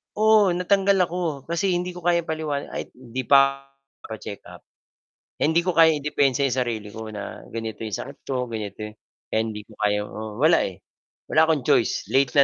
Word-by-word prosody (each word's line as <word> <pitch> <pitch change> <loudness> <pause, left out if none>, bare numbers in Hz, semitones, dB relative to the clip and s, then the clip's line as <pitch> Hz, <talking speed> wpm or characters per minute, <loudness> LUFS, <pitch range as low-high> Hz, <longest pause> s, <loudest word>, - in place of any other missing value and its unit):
Oo, 215 -4 +5
natanggal 195 +2 +3
ako 165 -5 -3
kasi 175 +2 0
hindi 180 +1 -2
ko 180 - -9
kayang 175 0 +2
paliwanag 155 -3 -3
ay - - -3
hindi 125 0 -6
pa 135 0 +4 0.3
pa-check-up. 110 -2 -9 0.7
Eh, - - -3
hindi 165 - +4
ko 180 +1 -1
kayang 160 -2 +6
idepensa 140 -2 +1
'yong 125 - -1
sarili 115 -5 -2
ko 110 -1 -7
na 105 -1 -7
ganito 115 -1 -5
'yong 110 -3 -3
sakit - - -8
ko 125 -2 -2
ganito 110 -3 -6
yung 105 0 -6 0.3
kaya 110 - 0
hindi 110 -2 -5
ko 110 - -16
kayang 105 0 +1
oo, 110 +1 -7
wala, 155 +4 +5 0.6
wala - - +2
akong 160 -4 +2
choice - - +2
late 130 +3 +2
na, - - +9
135 Hz, 185 wpm, -24 LUFS, 110-170 Hz, 0.7 s, na